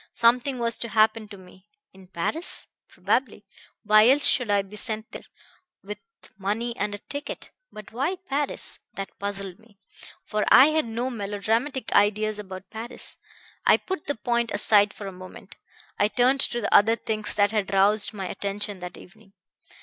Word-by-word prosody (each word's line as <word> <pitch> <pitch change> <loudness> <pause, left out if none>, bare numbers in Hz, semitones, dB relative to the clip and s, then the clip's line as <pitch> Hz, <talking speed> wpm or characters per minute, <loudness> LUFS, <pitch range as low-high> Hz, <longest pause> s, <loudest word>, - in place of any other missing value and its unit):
Something 250 +3 +2
was 235 -1 -1
to 235 - -4
happen 215 +1 +2
to 205 -1 -11
me. 185 +1 -18 0.3
In 190 -1 -16
Paris? 190 - 0 0.2
Probably - - -1 0.4
why 215 +1 +6
else 285 +2 +6
should 250 -5 +4
I 200 -1 +2
be 195 +2 -13
sent 220 0 -4
there, - - -10 0.6
with 210 +2 -7 0.4
money 225 +5 -2
and 205 -3 -2
a - - -7
ticket? 285 +7 -7 0.2
But 210 -2 -11
why 275 +11 -1
Paris? 295 -6 -3 0.2
That 195 0 -6
puzzled 200 -1 -5
me, 220 -2 -23 0.5
for 210 0 -1
I 270 +4 +8
had 310 -5 0
no 240 +3 -3
melodramatic 225 +5 -2
ideas 210 +1 +2
about 190 -2 -9
Paris. 225 +2 -6 0.5
I - - +5
put 375 -5 -6
the 285 - -1
point 235 +1 -1
aside 205 0 +4
for 210 - -10
a 195 - -5
moment. 185 +1 -12 0.4
I 205 - +4
turned 250 +4 +2
to 240 -3 -1
the 205 - -1
other 225 +3 +6
things 215 -2 -3
that 205 0 +3
had 210 -3 -1
roused 200 +2 +3
my 200 -3 -6
attention 200 +1 -4
that 180 0 -8
evening. 200 +1 -17
215 Hz, 170 wpm, -25 LUFS, 200-235 Hz, 0.6 s, I